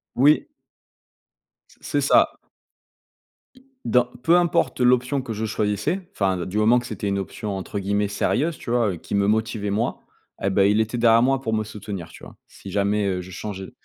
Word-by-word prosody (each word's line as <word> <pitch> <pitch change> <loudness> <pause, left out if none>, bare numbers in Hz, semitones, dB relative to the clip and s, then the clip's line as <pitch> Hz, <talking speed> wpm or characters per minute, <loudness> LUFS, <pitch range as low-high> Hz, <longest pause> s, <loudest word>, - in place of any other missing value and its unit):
Oui. 150 - +4 1.2
C' - - -22
c'est - - -1
ça. - - +4 1.5
Dans 125 -1 +3 0.2
peu 165 +5 +4
importe 175 -6 +1
l'option 125 +2 +2
que 115 - -5
je 110 +1 -3
choisissais, 110 - -1
enfin 95 -3 0
du 95 +3 -4
moment 115 +3 +5
que 120 - -2
c'était 105 -2 -4
une 100 0 0
option 100 +1 -4
entre 100 +2 -5
guillemets 100 +1 0
«sérieuse», 145 +10 0
tu - - -8
vois? 115 -6 +1
Qui 80 - -5
me 100 0 +2
motivait, 110 -1 0
moi, 110 +4 -1 0.4
eh 95 - +1
beh, 100 +1 +4
il 105 +1 +3
était 115 +2 -1
derrière 115 0 +5
moi 135 0 +2
pour 110 -4 -2
me 110 - 0
soutenir, 100 -5 -7
tu - - -15
vois? - - -12
Si 100 - -12
jamais, 100 +1 0
heu, 90 -1 -1
je 95 +1 -11
changeais. 95 -1 -6
105 Hz, 185 wpm, -23 LUFS, 100-120 Hz, 1.5 s, moment